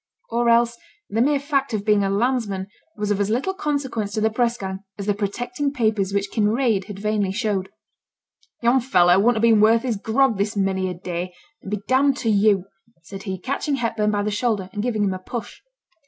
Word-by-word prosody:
Or 235 +1 +2
else 235 0 +3 0.3
the 225 +2 +1
mere 285 +3 +3
fact 275 -4 -1
of 205 -1 -4
being 210 -2 +3
a 195 - 0
landsman 205 -2 0 0.3
was 210 0 -1
of 205 - 0
as 200 0 0
little 260 - 0
consequence 275 - -2
to 215 - -1
the 220 +1 +2
press 235 +1 +1
gang, 190 -2 -5 0.2
as 200 - -5
the 205 - +2
protecting 245 +7 -2
papers 215 -7 0
which 200 0 -1
Kinraid 220 -2 +1
had 205 - -8
vainly 205 -1 0
showed. 200 -3 -1 0.9
'Yon 240 +3 +4
fellow 180 -7 +4
wouldn't 235 +4 +3
have - - 0
been 225 -2 +5
worth 225 +2 +5
his 240 -5 -1
grog 225 +1 +1
this 205 +1 -1
many 190 -1 0
a 180 - -5
day, 180 0 -5 0.3
and - - -9
be 210 - -1
d 260 - +3
d 280 0 +4
to 255 -4 -2
you,' 200 -2 +3 0.4
said 195 +3 -9
he, 190 - -2
catching 275 - -2
Hepburn 230 -4 0
by 205 -1 0
the 210 - -1
shoulder, 210 -3 -1
and 205 - -2
giving 220 -2 0
him 195 -2 +1
a 185 - -5
push. 230 +5 -7
215 Hz, 215 wpm, -22 LUFS, 200-240 Hz, 0.9 s, been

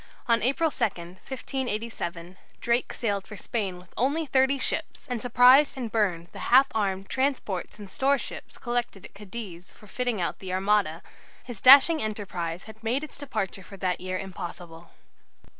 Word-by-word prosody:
On 230 -1 +3
2 - - -1
April, 315 +4 +1
1587, 200 -2 -4 0.2
Drake 235 +1 +1
sailed 200 -4 -2
for 215 - -9
Spain 195 -4 -3
with 180 0 -17
only 285 +7 +1
thirty 265 0 +3
ships, - - -3
and 245 -3 -3
surprised 255 +4 +6
and 240 -4 -4
burned 180 -6 0
the - - -10
half 260 +3 +8
armed 195 -3 -1
transports 260 -11 -2
and 205 -2 -9
storeships 275 +7 -1
collected 240 -5 -3
at - - -13
Cadiz 195 -3 -9
for 215 - -17
fitting 245 +1 -2
out 170 - -2
the 185 -1 -5
Armada. 190 -3 +1 0.4
His 240 -5 -8
dashing 280 +5 +8
enterprise 185 -5 -4
had 220 0 -13
made 245 +6 0
its 305 - -9
departure 215 -9 -3
for 195 +2 -12
that 185 -2 -1
year 185 0 -3
impossible. 175 -3 -8
215 Hz, 160 wpm, -27 LUFS, 185-255 Hz, 0.4 s, half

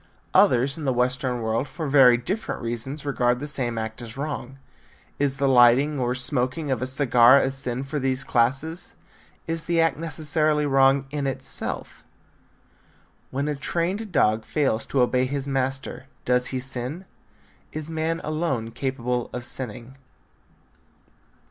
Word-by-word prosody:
Others 135 +5 +4
in 150 - -5
the 130 - +1
western 125 0 0
world 115 +5 -1
for 160 - -5
very 135 -3 +6
different 190 - -3
reasons 120 +6 -5
regard 125 -3 +1
the 145 - -5
same 125 -5 +1
act 110 +1 -4
as 115 +1 -8
wrong. 135 -2 -5 0.6
Is 140 -1 0
the 140 0 +1
lighting 130 +3 +5
or 125 0 0
smoking 130 +3 0
of 130 - -1
a 130 - -1
cigar 130 -1 +5
a 135 - +2
sin 130 -1 -3
for 140 +2 -3
these 130 0 0
classes? 135 +8 -1 0.5
Is 165 0 -3
the 170 -1 +1
act 165 -4 +2
necessarily 155 -1 0
wrong 135 0 +4
in 145 -2 -2
itself? 135 - -4 1.3
When 140 +2 -2
a 150 - 0
trained 175 +8 -2
dog 110 -8 +2
fails 135 -6 0
to 135 - +1
obey 125 +1 +2
his 140 +1 -3
master, 135 -1 -2 0.2
does 125 0 +2
he 130 - -2
sin? 130 +7 -5 0.7
Is 155 -1 -4
man 160 +1 -1
alone 155 -8 -2
capable 125 -2 -2
of 125 -1 -6
sinning? 125 +1 -7
135 Hz, 150 wpm, -24 LUFS, 125-150 Hz, 1.3 s, very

